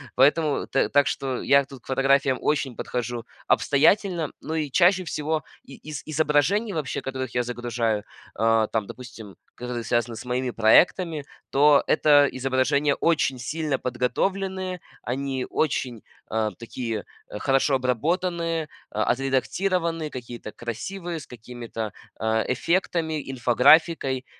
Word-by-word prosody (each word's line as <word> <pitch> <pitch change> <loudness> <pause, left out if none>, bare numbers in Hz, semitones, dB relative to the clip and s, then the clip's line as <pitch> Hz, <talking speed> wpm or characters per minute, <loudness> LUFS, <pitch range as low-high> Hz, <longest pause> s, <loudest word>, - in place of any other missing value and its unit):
Поэтому 145 +3 +3
т 135 - +1
так 145 0 +4
что 130 -2 -2
я 140 0 +4
тут 135 -2 -12
к - - -31
фотографиям 135 0 +2
очень 140 -4 0
подхожу 120 -1 -4 0.2
обстоятельно. 165 +2 +2
Ну, 160 - -5
и 155 -2 -1
чаще 185 +3 +4
всего 155 -1 -2 0.2
и 135 - -12
из 150 -2 -7
изображений 155 +8 +1
вообще, 155 -7 -2
которых 130 -2 -5
я 125 - +2
загружаю, 120 -3 -2 0.3
а, 110 0 +3
там, 110 -2 -1
допустим, 110 -5 -10 0.2
которые 125 -1 -5
связаны 120 -1 0
с 110 - -8
моими 125 +1 -1
проектами, 155 - +3 0.3
то 145 +1 +5
это 145 -2 +5
изображения 135 +2 +1
очень 150 -6 +1
сильно 150 +3 -2
подготовленные. 185 +9 -2 0.2
Они 130 +1 -2
очень, 130 -6 -1 0.2
а, 110 -1 -1
такие, 115 +1 -5 0.2
хорошо 135 +5 +1
обработанные, 165 - -1 0.2
а, 110 - 0
отредактированные, 165 +6 0
какие-то 120 -4 -8
красивые, 165 - -5
с - - -13
какими-то, 115 -2 -7 0.3
а, 110 0 +1
эффектами, 160 0 -1
инфографикой. 130 +2 +3
135 Hz, 125 wpm, -25 LUFS, 120-160 Hz, 0.3 s, то